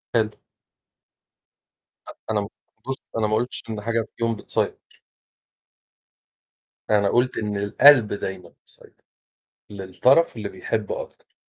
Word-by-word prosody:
حلو. 110 Hz, -2 st, +1 dB, 1.7 s
أ -, -, -9 dB
أنا 105 Hz, -2 st, 0 dB, 0.4 s
بُصّ، 135 Hz, -, -2 dB, 0.2 s
أنا 110 Hz, -1 st, +1 dB
ما 110 Hz, -, +1 dB
قُلتش 120 Hz, +3 st, -2 dB
إن 110 Hz, -2 st, -4 dB
حاجة 115 Hz, 0 st, -1 dB
فيهم 115 Hz, -1 st, 0 dB
بتسيطر. -, -, -2 dB, 2.1 s
أنا 100 Hz, -2 st, +3 dB
قُلت 125 Hz, +1 st, +1 dB
إن 105 Hz, -2 st, -2 dB
القلب 110 Hz, +3 st, +6 dB
دايمًا 95 Hz, -3 st, -6 dB
مسيطر -, -, -19 dB, 0.7 s
للطرف 105 Hz, -, +2 dB
اللي 105 Hz, -2 st, -4 dB
بيحب 110 Hz, -3 st, -3 dB
أكتر. -, -, -8 dB
110 Hz, 110 wpm, -23 LUFS, 100-115 Hz, 2.1 s, القلب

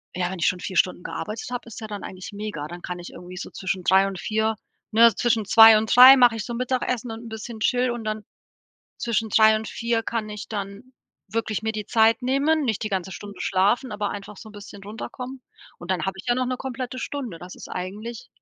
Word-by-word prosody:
ja, 180 Hz, -1 st, -1 dB
wenn 190 Hz, -1 st, -6 dB
ich -, -, +2 dB
schon 185 Hz, -, 0 dB
4 185 Hz, -1 st, -5 dB
Stunden 180 Hz, -1 st, +2 dB
gearbeitet 215 Hz, +1 st, -5 dB
habe, 245 Hz, -1 st, -5 dB
ist 225 Hz, 0 st, -9 dB
ja 220 Hz, -, -5 dB
dann 205 Hz, -1 st, -7 dB
eigentlich 185 Hz, +3 st, -8 dB
mega, 205 Hz, -8 st, -5 dB
dann 175 Hz, +2 st, -9 dB
kann 180 Hz, 0 st, -5 dB
ich 175 Hz, -, -9 dB
irgendwie 180 Hz, +1 st, -10 dB
so 190 Hz, -, -6 dB
zwischen 190 Hz, -1 st, -4 dB
3:00 190 Hz, +2 st, +5 dB
und 195 Hz, -2 st, -6 dB
4:00 220 Hz, +2 st, 0 dB, 0.4 s
ne, 230 Hz, +2 st, +7 dB
zwischen 230 Hz, -2 st, +1 dB
2:00 225 Hz, +1 st, +9 dB
und 220 Hz, 0 st, 0 dB
3:00 260 Hz, +2 st, +11 dB
mache 245 Hz, -2 st, +5 dB
ich 220 Hz, -, -4 dB
so 240 Hz, -, -5 dB
Mittagessen 250 Hz, -1 st, -2 dB
und 225 Hz, +1 st, -7 dB
'n 230 Hz, -, -9 dB
bisschen 220 Hz, +1 st, -7 dB
chill 250 Hz, +1 st, +2 dB
und 240 Hz, -1 st, -4 dB
dann 215 Hz, 0 st, -3 dB, 0.7 s
zwischen 225 Hz, -1 st, -1 dB
3:00 220 Hz, 0 st, +5 dB
und 215 Hz, -1 st, -5 dB
4:00 230 Hz, +1 st, -1 dB
kann 220 Hz, -1 st, -3 dB
ich 210 Hz, -1 st, -7 dB
dann 205 Hz, +4 st, -7 dB, 0.4 s
wirklich 220 Hz, -2 st, -2 dB
mir 220 Hz, 0 st, -1 dB
die 215 Hz, -1 st, -4 dB
Zeit 225 Hz, +3 st, +3 dB
nehmen 280 Hz, +5 st, +2 dB
nicht 220 Hz, -6 st, -1 dB
die 215 Hz, -, -2 dB
ganze 190 Hz, -1 st, -3 dB
Stunde 200 Hz, -2 st, -9 dB
schlafen, 205 Hz, +6 st, +1 dB
aber 210 Hz, -1 st, -2 dB
einfach 205 Hz, 0 st, -8 dB
so 220 Hz, -, -11 dB
'n 215 Hz, -, -14 dB
bisschen 205 Hz, -1 st, -11 dB
runterkommen. 250 Hz, +5 st, -7 dB, 0.4 s
Und 175 Hz, -, -8 dB
dann 180 Hz, -3 st, 0 dB
habe 190 Hz, -, -2 dB
ich 190 Hz, -, -10 dB
ja 240 Hz, -, +3 dB
noch 255 Hz, 0 st, 0 dB
'ne 255 Hz, 0 st, -2 dB
komplette 255 Hz, 0 st, -5 dB
Stunde, 255 Hz, -12 st, -5 dB
das 180 Hz, +2 st, -10 dB
ist -, -, -11 dB
eigentlich 210 Hz, +6 st, -6 dB
220 Hz, 235 wpm, -24 LUFS, 195-235 Hz, 0.7 s, 3:00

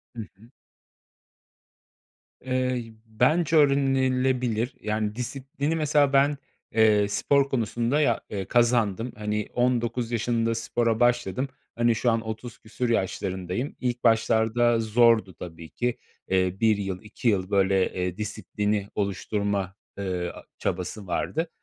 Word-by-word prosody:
Hı 115 Hz, -, -4 dB, 0.2 s
hı. 115 Hz, +4 st, -18 dB, 1.9 s
Eee, 130 Hz, -3 st, -2 dB
bence 150 Hz, +9 st, +2 dB
öğrenilebilir, 130 Hz, -4 st, +2 dB
yani, 105 Hz, -1 st, -2 dB
disiplini 135 Hz, +5 st, -3 dB
mesela 145 Hz, -3 st, +2 dB
ben, 140 Hz, +1 st, +4 dB, 0.4 s
eee, 105 Hz, -2 st, +4 dB
spor 140 Hz, +6 st, +2 dB
konusunda 120 Hz, +3 st, 0 dB
ya 120 Hz, -6 st, +2 dB
eee, 100 Hz, -2 st, -4 dB
kazandım. 120 Hz, 0 st, +2 dB
Hani, 105 Hz, 0 st, -2 dB
19 120 Hz, -1 st, 0 dB
yaşında 115 Hz, 0 st, 0 dB
spora 115 Hz, 0 st, 0 dB
başladım. 120 Hz, +1 st, +1 dB, 0.3 s
Hani, 120 Hz, 0 st, +2 dB
şu 120 Hz, +2 st, +2 dB
an 115 Hz, -, +1 dB
30 110 Hz, +1 st, -7 dB
küsur 115 Hz, +3 st, -3 dB
yaşlarındayım. 95 Hz, +2 st, -2 dB
İlk 125 Hz, -1 st, -2 dB
başlarda 115 Hz, +1 st, +3 dB
zordu 115 Hz, -2 st, +3 dB
tabii 80 Hz, -2 st, -9 dB
ki. 120 Hz, -1 st, -2 dB, 0.3 s
Eee, 95 Hz, -1 st, +1 dB
1 110 Hz, -2 st, +3 dB
yıl, 95 Hz, -2 st, -4 dB
2 110 Hz, +3 st, -5 dB
yıl, 95 Hz, -3 st, 0 dB
böyle, 95 Hz, -1 st, +2 dB
eee, 90 Hz, +1 st, -3 dB
disiplini 105 Hz, -1 st, -2 dB
oluşturma, 100 Hz, -1 st, -2 dB, 0.2 s
eee, 90 Hz, -3 st, -2 dB
a -, -, -11 dB, 0.2 s
çabası 95 Hz, +2 st, -3 dB
vardı. 160 Hz, -, -2 dB
115 Hz, 120 wpm, -26 LUFS, 105-125 Hz, 1.9 s, ben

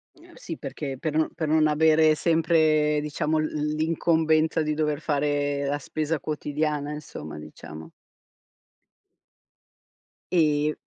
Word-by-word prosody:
Ehm, 340 Hz, +1 st, -18 dB
sì 165 Hz, -, -7 dB
perché, 135 Hz, -1 st, -5 dB
per 155 Hz, -2 st, -3 dB
non 160 Hz, -, +1 dB
per 155 Hz, -, -3 dB
non 155 Hz, 0 st, +3 dB
avere 155 Hz, +1 st, +4 dB
sempre 155 Hz, -2 st, +2 dB
diciamo 150 Hz, +1 st, -1 dB
l 155 Hz, -, +1 dB, 0.3 s
l'incombenza 160 Hz, 0 st, +1 dB
di 150 Hz, 0 st, -1 dB
dover 150 Hz, -1 st, -1 dB
fare 145 Hz, -1 st, 0 dB
la 145 Hz, +1 st, -1 dB
spesa 155 Hz, +2 st, -2 dB
quotidiana 150 Hz, -1 st, -2 dB
insomma, 75 Hz, -, -8 dB
diciamo. 75 Hz, -, -10 dB, 2.5 s
E 150 Hz, -2 st, +2 dB
155 Hz, 115 wpm, -25 LUFS, 145-160 Hz, 2.5 s, avere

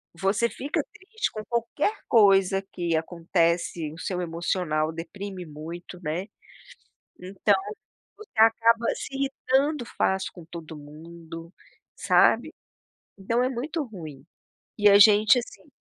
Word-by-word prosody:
você 195 Hz, +6 st, +1 dB
fica 280 Hz, +5 st, -2 dB
triste 440 Hz, +3 st, -4 dB
com 215 Hz, -, -6 dB
qualquer 235 Hz, -, -1 dB
coisa 195 Hz, -3 st, +4 dB
que 170 Hz, -2 st, -1 dB
acontece, 170 Hz, -1 st, -1 dB
o 165 Hz, -, -12 dB
seu 180 Hz, +1 st, -3 dB
emocional 165 Hz, -2 st, -1 dB
deprime 185 Hz, +3 st, -7 dB
muito, 165 Hz, +4 st, -9 dB
né. 160 Hz, +5 st, -2 dB, 0.9 s
Então, 195 Hz, +2 st, +1 dB, 0.6 s
você 430 Hz, -, -14 dB
acaba 230 Hz, +1 st, +4 dB
se 270 Hz, -, -7 dB
irritando 275 Hz, 0 st, 0 dB
fácil 190 Hz, 0 st, 0 dB
com 175 Hz, -, -12 dB
todo 165 Hz, -1 st, -9 dB
mundo, 165 Hz, +3 st, -11 dB, 0.4 s
sabe. -, -, +3 dB, 0.7 s
Então 230 Hz, +5 st, 0 dB
é 255 Hz, -, +2 dB
muito 290 Hz, +6 st, -3 dB
ruim. 155 Hz, -, -10 dB, 0.5 s
E 210 Hz, -1 st, +5 dB
a 200 Hz, -, +8 dB
gente, 210 Hz, +2 st, +7 dB
assim 245 Hz, +5 st, -11 dB
190 Hz, 120 wpm, -26 LUFS, 165-230 Hz, 0.9 s, a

